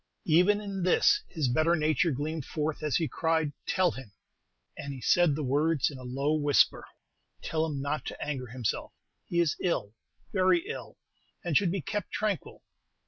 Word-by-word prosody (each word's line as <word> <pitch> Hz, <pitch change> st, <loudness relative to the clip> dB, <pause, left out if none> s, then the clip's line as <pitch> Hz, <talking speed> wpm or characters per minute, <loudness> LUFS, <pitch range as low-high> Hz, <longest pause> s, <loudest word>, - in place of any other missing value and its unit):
Even 180 Hz, +6 st, +4 dB
in 200 Hz, -2 st, -5 dB
this 185 Hz, -, +4 dB
his 155 Hz, -7 st, -1 dB
better 155 Hz, +7 st, +3 dB
nature 155 Hz, +1 st, +2 dB
gleamed 150 Hz, +2 st, -3 dB
forth 150 Hz, +2 st, -3 dB
as 150 Hz, -4 st, 0 dB
he 165 Hz, -, +1 dB
cried, 160 Hz, -2 st, 0 dB
'Tell 185 Hz, -2 st, +2 dB
him' 130 Hz, -7 st, -10 dB, 0.6 s
and 140 Hz, -1 st, -6 dB
he -, -, -8 dB
said 170 Hz, +3 st, +3 dB
the 155 Hz, -, -3 dB
words 145 Hz, +3 st, +2 dB
in 135 Hz, -, -9 dB
a -, -, -10 dB
low 135 Hz, +4 st, -1 dB
whisper 145 Hz, -2 st, +3 dB, 0.6 s
'tell 160 Hz, 0 st, 0 dB
him 145 Hz, -3 st, -3 dB
not 145 Hz, +2 st, -2 dB
to -, -, -6 dB
anger 135 Hz, -4 st, -3 dB
himself; 120 Hz, -1 st, -3 dB, 0.3 s
he 170 Hz, -, 0 dB
is 170 Hz, -3 st, +2 dB
ill, 110 Hz, -, -1 dB, 0.4 s
very 185 Hz, -3 st, +3 dB
ill, 125 Hz, -4 st, -7 dB, 0.5 s
and 170 Hz, -4 st, -1 dB
should 180 Hz, +2 st, +4 dB
be 195 Hz, -1 st, -2 dB
kept 205 Hz, +3 st, -3 dB
tranquil. 210 Hz, -4 st, -3 dB
155 Hz, 175 wpm, -29 LUFS, 140-175 Hz, 0.6 s, Even